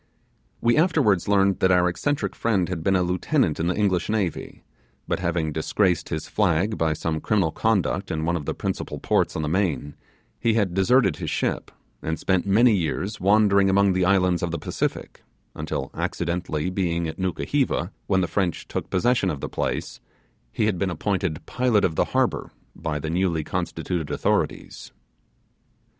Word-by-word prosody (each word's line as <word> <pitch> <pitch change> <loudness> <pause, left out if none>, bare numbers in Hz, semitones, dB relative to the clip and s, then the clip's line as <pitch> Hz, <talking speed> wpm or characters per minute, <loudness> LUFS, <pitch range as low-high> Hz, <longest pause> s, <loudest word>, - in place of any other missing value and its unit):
We 120 +3 +3
afterwards 150 - +3
learned 100 -1 +3
that 95 - +3
our 90 -1 +4
eccentric 140 - -1
friend 100 -7 +1
had 85 -4 -4
been 95 +2 +2
a 90 - +3
lieutenant 90 - 0
in 80 - 0
the 90 - 0
English 95 -4 +1
navy; 105 -6 -2 0.4
but - - -1
having 85 -3 -1
disgraced 90 +4 0
his 80 -2 -4
flag 100 +1 +1
by 80 -4 +1
some 80 0 -3
criminal 95 -7 +1
conduct 95 -3 0
in 80 0 -2
one 85 +1 +1
of 75 -4 -4
the - - -3
principal - - -4
ports - - 0
on 80 - -2
the - - -1
main, 80 -4 -1 0.5
he 115 -1 +2
had 100 -6 +1
deserted 95 - +3
his - - -4
ship, - - -2 0.3
and 80 0 -2
spent 95 0 0
many 115 +4 +5
years 90 +4 -2
wandering 100 0 +4
among 100 0 +4
the 90 0 +1
islands 90 -2 +3
of 85 - -1
the 85 - -3
Pacific, - - -4 0.3
until - - -4
accidentally 85 -1 -2
being 85 -3 -1
at 80 +2 -7
Nukuheva 95 - -1 0.2
when 95 -1 +2
the 90 - 0
French 95 -3 -1
took - - -4
possession 100 +1 +2
of 75 -5 -3
the - - -4
place, - - -3 0.5
he 110 - 0
had 105 -5 0
been 95 - 0
appointed 90 -1 -2
pilot 120 -5 +2
of 85 - 0
the - - +2
harbour - - 0 0.3
by 75 -1 -3
the 80 +2 -4
newly 85 -2 0
constituted 80 +1 -3
authorities. - - -2
90 Hz, 175 wpm, -24 LUFS, 85-100 Hz, 0.5 s, many